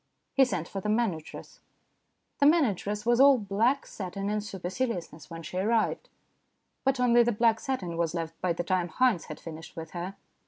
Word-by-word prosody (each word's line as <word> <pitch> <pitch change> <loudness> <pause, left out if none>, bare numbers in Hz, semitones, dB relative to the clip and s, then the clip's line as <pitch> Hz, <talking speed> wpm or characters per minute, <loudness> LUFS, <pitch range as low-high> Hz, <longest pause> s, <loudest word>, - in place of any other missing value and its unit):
He 270 - +5
sent 175 -9 -3
for 195 - -5
the 210 - -2
manageress. 210 -8 -2 0.8
The 285 - +6
manageress 210 - +2
was 240 +1 +3
all 275 0 +8
black 225 +6 +1
satin 195 +1 -4
and 210 0 -1
super 190 -4 -5
ciliousness 185 -9 -3
when 165 -1 -8
she 180 - -6
arrived, 220 +3 0 0.7
but 270 -1 +1
only 240 -1 +5
the 240 0 +3
black 225 0 +3
satin 185 -11 -3
was 170 0 0
left 165 -1 -3
by 180 -2 +1
the 175 - -3
time 180 0 0
Haynes 240 -2 +2
had 155 - -8
finished 160 +1 -9
with 160 -1 -7
her. 180 +2 -5
200 Hz, 185 wpm, -28 LUFS, 175-240 Hz, 0.8 s, all